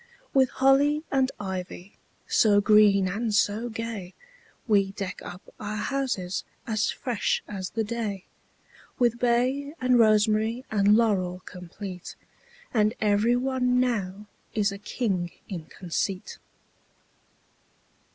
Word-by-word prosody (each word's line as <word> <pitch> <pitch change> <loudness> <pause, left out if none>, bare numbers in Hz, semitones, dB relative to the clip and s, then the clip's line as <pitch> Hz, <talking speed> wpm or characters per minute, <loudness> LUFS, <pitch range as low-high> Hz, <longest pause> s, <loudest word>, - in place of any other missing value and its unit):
With 265 -2 +4
holly 285 +3 +3
and 265 -1 +2
ivy 190 0 -6 0.3
So 205 -2 +4
green 205 -2 +5
and 220 +4 -2
so 215 +4 +1
gay, 225 -5 -6 0.5
We 200 -3 +3
deck 195 -2 -5
up 180 +2 -10
our 210 0 -4
houses 210 -7 -2 0.2
As 215 -4 0
fresh 245 -5 -1
as 190 -3 -5
the 225 - -2
day; 215 -4 -4 0.7
With 240 -1 +2
bay 255 +5 +1
and 255 -1 +3
rosemary 220 +2 +3
And 205 0 +4
laurel 185 -5 +1
complete; 180 0 -8 0.6
And 215 -1 +2
every 215 +3 +3
one 250 -1 +1
now 210 -5 -1 0.3
Is 210 -2 +2
a 200 - -7
king 195 -5 -2 0.2
in 175 -6 -6
conceit. 185 +2 -4
215 Hz, 115 wpm, -26 LUFS, 195-240 Hz, 0.7 s, green